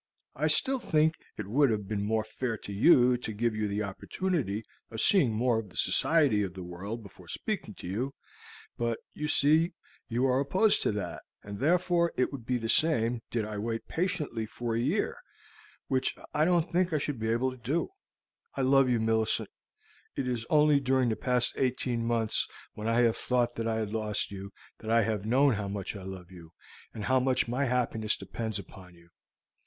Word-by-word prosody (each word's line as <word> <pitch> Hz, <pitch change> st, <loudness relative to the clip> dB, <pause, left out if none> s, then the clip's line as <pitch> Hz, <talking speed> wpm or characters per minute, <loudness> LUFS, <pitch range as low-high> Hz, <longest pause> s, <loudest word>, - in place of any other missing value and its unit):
I -, -, +1 dB
still 270 Hz, -1 st, +3 dB
think 160 Hz, -6 st, +2 dB, 0.2 s
that -, -, -4 dB
it -, -, -12 dB
would 140 Hz, +4 st, +4 dB
have 105 Hz, -3 st, -1 dB
been 105 Hz, -1 st, -2 dB
more 110 Hz, +1 st, +1 dB
fair 115 Hz, +1 st, -3 dB
to 100 Hz, -, -8 dB
you 125 Hz, +2 st, +5 dB
to 120 Hz, -, -5 dB
give 110 Hz, +1 st, -1 dB
you 110 Hz, -1 st, -1 dB
the 105 Hz, +1 st, -1 dB
opportunity 115 Hz, -, -2 dB, 0.3 s
of 110 Hz, -, -6 dB
seeing 170 Hz, -, +5 dB
more 115 Hz, +1 st, +1 dB
of 105 Hz, -3 st, -7 dB
the -, -, -12 dB
society 145 Hz, -10 st, +3 dB
of 95 Hz, -2 st, -3 dB
the 95 Hz, -, -6 dB
world 100 Hz, +6 st, -6 dB
before 100 Hz, -5 st, -14 dB
speaking -, -, -3 dB
to -, -, -9 dB
you, 125 Hz, +9 st, -3 dB, 0.6 s
but 115 Hz, -1 st, 0 dB, 0.2 s
you 150 Hz, -, -3 dB
see 155 Hz, +3 st, +3 dB, 0.3 s
you 120 Hz, +2 st, 0 dB
are 130 Hz, 0 st, +3 dB
opposed 190 Hz, +10 st, +3 dB
to -, -, +1 dB
that, 105 Hz, -, -4 dB, 0.2 s
and 100 Hz, 0 st, -7 dB
therefore 170 Hz, +3 st, +2 dB
it 125 Hz, -, +1 dB
would 130 Hz, -5 st, -8 dB
be 125 Hz, -, +1 dB
the 115 Hz, -1 st, -4 dB
same 120 Hz, -4 st, +2 dB
did 115 Hz, -3 st, -1 dB
I 105 Hz, -1 st, -5 dB
wait 115 Hz, +1 st, -3 dB
patiently 155 Hz, -11 st, -2 dB
another 115 Hz, -2 st, -1 dB
year, 120 Hz, -, 0 dB, 0.7 s
which 130 Hz, -1 st, 0 dB, 0.2 s
I 155 Hz, +1 st, +3 dB
don't 175 Hz, -1 st, +2 dB
think 180 Hz, 0 st, +2 dB
I -, -, +3 dB
should 140 Hz, -3 st, -3 dB
be 110 Hz, 0 st, -1 dB
able 120 Hz, +3 st, +1 dB
to 130 Hz, -, -10 dB
do. 140 Hz, -, -1 dB, 0.7 s
I 135 Hz, -, 0 dB
love 135 Hz, 0 st, +4 dB
you, 120 Hz, -2 st, +2 dB
Millicent. 110 Hz, 0 st, +1 dB, 0.6 s
It 130 Hz, -, -2 dB
is 120 Hz, -2 st, -2 dB
only 150 Hz, -1 st, +5 dB
during 130 Hz, -2 st, +2 dB
the 110 Hz, -, 0 dB
past 125 Hz, 0 st, +1 dB
eighteen 125 Hz, -2 st, 0 dB
months, 115 Hz, -2 st, 0 dB, 0.3 s
when 105 Hz, +1 st, -5 dB
I 115 Hz, +1 st, +3 dB
have 115 Hz, -2 st, +3 dB
thought 120 Hz, -1 st, 0 dB
that 115 Hz, -1 st, -3 dB
I 115 Hz, -, 0 dB
had 110 Hz, -1 st, -2 dB
lost 105 Hz, -2 st, -1 dB
you, 100 Hz, 0 st, -7 dB, 0.3 s
that 110 Hz, -, -7 dB
I 115 Hz, 0 st, +4 dB
have 105 Hz, -1 st, -2 dB
known 135 Hz, +3 st, +4 dB
how 105 Hz, -1 st, -3 dB
much 100 Hz, 0 st, -4 dB
I 100 Hz, -, -7 dB
love 95 Hz, -1 st, -8 dB
you, 85 Hz, -2 st, -13 dB, 0.4 s
and 105 Hz, -, -7 dB
how 130 Hz, 0 st, +3 dB
much 130 Hz, -1 st, +2 dB
my 125 Hz, +4 st, 0 dB
happiness 115 Hz, -4 st, 0 dB
depends 110 Hz, +3 st, -4 dB
upon 90 Hz, -2 st, -11 dB
you. 85 Hz, 0 st, -21 dB
115 Hz, 200 wpm, -29 LUFS, 105-135 Hz, 0.7 s, you